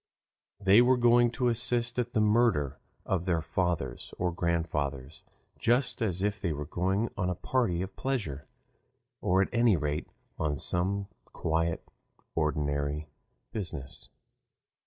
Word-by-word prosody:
They 100 +4 +6
were 125 +1 +4
going 120 0 +5
to 125 0 0
assist 120 0 +1
at 120 0 -2
the - - +2
murder 105 - +2 0.3
of 90 -2 -1
their 85 -3 +1
fathers 85 -9 -2
or 90 0 0
grandfathers 80 -5 -2 0.4
just 125 +2 +1
as 95 -4 0
if 105 0 -1
they 85 - 0
were 75 0 -4
going 95 +8 0
on 90 -3 -1
a 90 - -1
party 95 -5 0
of 95 - -8
pleasure, 100 - -3 0.7
or 95 +2 +3
at - - -4
any 115 -5 +4
rate 75 -1 -2 0.3
on 75 -2 0
some 95 +7 0 0.3
quite 80 +1 0 0.5
ordinary 75 -1 -1 0.4
business. 75 - -5
90 Hz, 135 wpm, -29 LUFS, 75-115 Hz, 0.7 s, They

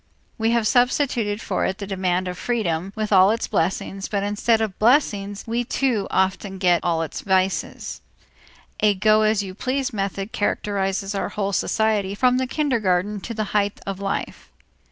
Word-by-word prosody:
We 225 +1 +2
have 235 -1 +2
substituted 245 -3 +1
for - - -1
it 190 - -1
the 205 - -5
demand 185 -2 -1
of 180 - -4
freedom 190 -5 -2
with 215 -1 -1
all 190 0 +7
its 225 +2 0
blessings, 190 +3 -1
but 200 -1 -1
instead 210 +3 +1
of 220 -2 0
the - - -33
blessings 210 -5 +2
we 235 +1 -1
too 240 -4 0
often 190 +1 0
get 180 -2 +2
all 165 -2 +1
its 160 - -6
vices. 190 -1 -1 0.8
A 210 -1 +3
go 215 +2 +4
as 215 -1 +2
you 190 -1 -7
please 260 +5 -2
method 195 0 -3
characterizes 200 -1 -1
our 195 - -2
whole 200 -1 -2
society 210 -2 +1
from 250 +3 +3
the 260 - -1
kindergarten 210 - 0
to 230 - -6
the 215 - -1
height 205 -1 +1
of 195 -1 -4
life. 195 0 -4
205 Hz, 175 wpm, -23 LUFS, 190-225 Hz, 0.8 s, all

